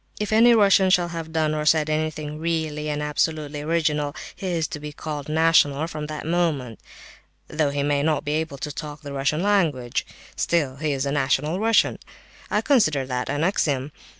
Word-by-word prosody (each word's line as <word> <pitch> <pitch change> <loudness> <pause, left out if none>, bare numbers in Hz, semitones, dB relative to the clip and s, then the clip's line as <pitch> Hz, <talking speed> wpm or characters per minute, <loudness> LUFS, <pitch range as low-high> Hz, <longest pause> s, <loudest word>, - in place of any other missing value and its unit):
If 210 0 -2
any 235 +2 +6
Russian 195 -3 +5
shall 180 -2 +3
have 165 -1 -6
done 155 -1 +1
or 155 0 -1
said 155 0 +3
anything 155 -1 -2
really 160 -2 -2
and 150 0 -2
absolutely 150 0 -1
original, 150 -2 0 0.2
he 195 - -6
is 170 -3 0
to 150 - -6
be 150 0 -7
called 150 -1 -6
national 160 -2 +3
from 155 -2 -6
that 150 0 -6
moment, 155 -9 -1 0.7
though 150 -1 0
he 140 0 -1
may 145 0 +1
not 155 0 0
be 145 - -1
able 155 -2 -2
to 150 +2 -5
talk 150 0 -7
the 140 -1 -7
Russian 145 +5 0
language; 160 -12 +1 0.3
still 145 -6 0
he 155 +1 -1
is 135 -1 -1
a 140 - -1
national 145 +4 0
Russian. 225 +1 +2 0.5
I - - +1
consider 155 - +2
that 125 -1 -3
an 145 +2 -1
axiom. 145 -6 0
155 Hz, 185 wpm, -23 LUFS, 145-165 Hz, 0.7 s, any